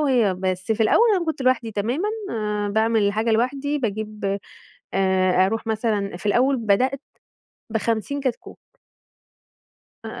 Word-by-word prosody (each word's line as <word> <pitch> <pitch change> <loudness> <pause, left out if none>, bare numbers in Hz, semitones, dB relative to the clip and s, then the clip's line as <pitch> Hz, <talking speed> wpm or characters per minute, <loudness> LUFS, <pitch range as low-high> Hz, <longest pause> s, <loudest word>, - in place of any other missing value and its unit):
وهي 245 -9 +2
بس 185 +2 -1
في 220 +1 0
الأول 465 - +4
أنا 345 - -1
كنت 315 -4 -3
لوحدي 255 -3 +1
تمامًا، 240 - -1 0.2
آآ، 210 -2 -2
باعمل 220 +1 +2
الحاجة 215 +3 +1
لوحدي 270 +6 0
باجيب 210 -4 -3 0.6
آآ، 185 -1 +3
أروح 225 +3 -2
مثلًا 210 -4 -1
في 180 - -14
الأول 255 +6 +3
بدأت 250 +5 +1 0.7
ب50 230 +5 -1
كتكوت. 255 -4 -4 1.5
آآ، - - -7
220 Hz, 130 wpm, -23 LUFS, 200-255 Hz, 1.5 s, الأول